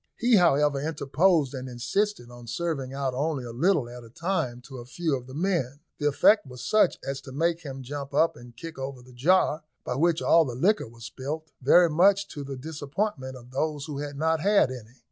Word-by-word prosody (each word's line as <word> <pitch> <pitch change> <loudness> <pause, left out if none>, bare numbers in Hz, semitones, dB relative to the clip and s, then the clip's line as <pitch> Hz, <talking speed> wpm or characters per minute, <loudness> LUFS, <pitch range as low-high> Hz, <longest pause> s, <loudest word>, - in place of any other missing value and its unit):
He, 235 -1 +4
however, 150 -5 +3
interposed, 155 0 +1
and 130 -1 -6
insisted 125 - -2
on 120 -1 -12
serving 135 +1 -3
out 135 -1 -2
only 145 0 -1
a 120 - -7
little 150 +2 +2
at 120 0 -10
a 115 - -13
time 160 -4 -2
to 130 0 -10
a 120 - -9
few 160 +3 -1
of 125 -1 -7
the 130 - -10
men. 155 -6 -1 0.2
The 150 - +1
effect 150 +5 +4
was 125 -1 -9
such 215 -4 +3
as 135 0 -3
to 130 - -11
make 165 +4 0
him 135 -4 -7
jump 140 +1 -6
up 165 - +2
and 120 0 -14
kick 165 -4 -8
over 135 -2 -6
the 125 0 -16
jar, 155 +4 +2 0.2
by - - -3
which 165 +5 +2
all 165 0 +5
the 125 -5 -5
liquor 195 - +2
was 115 0 -12
spilt, 155 +4 -6
very 170 +7 +6
much 200 +5 +4
to 145 - -6
the 135 -1 -6
disappointment 145 0 -4
of 125 0 -15
those 150 +1 -2
who 145 -3 -5
had 145 -1 -5
not 160 +1 +1
had 200 -5 +3
any. 120 -1 -10
140 Hz, 215 wpm, -26 LUFS, 130-165 Hz, 0.2 s, very